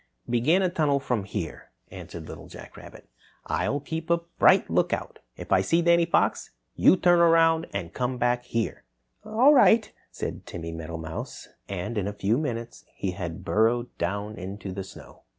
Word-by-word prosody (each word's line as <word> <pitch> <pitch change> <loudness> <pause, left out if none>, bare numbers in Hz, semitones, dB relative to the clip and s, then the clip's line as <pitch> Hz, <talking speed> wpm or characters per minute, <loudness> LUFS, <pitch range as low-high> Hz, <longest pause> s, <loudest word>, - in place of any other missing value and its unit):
"Begin 130 +11 +2
a 185 - +2
tunnel 150 -5 +1
from 125 -7 -2
here," 95 -5 -6 0.2
answered - - -9
Little - - -10
Jack - - -12
Rabbit. - - -13 0.4
"I'll 145 - -1
keep 160 +3 -6
a 170 - +4 0.2
bright - - +6
lookout. - - -1 0.2
If - - -9
I 95 - +5
see 165 - +2
Danny 170 0 +4
Fox, - - +1 0.3
you - - +6
turn 175 -1 +4
around 165 -1 +4
and 85 -4 -5
come 125 0 -2
back 120 0 0
here." 115 -2 -3 0.4
"All 245 +7 +4
right," 230 -5 +5 0.2
said - - -6
Timmy 85 -1 -6
Meadowmouse, 80 0 -7 0.2
and 100 +4 -3
in 100 - -2
a 100 - -3
few 105 +4 0
minutes 120 -6 -5
he 95 - -2
had 85 -3 -6
burrowed 120 +3 +1
down 100 +5 -3
into 95 +2 -6
the 95 +1 -5
snow. 95 - -14
120 Hz, 170 wpm, -26 LUFS, 95-165 Hz, 0.4 s, bright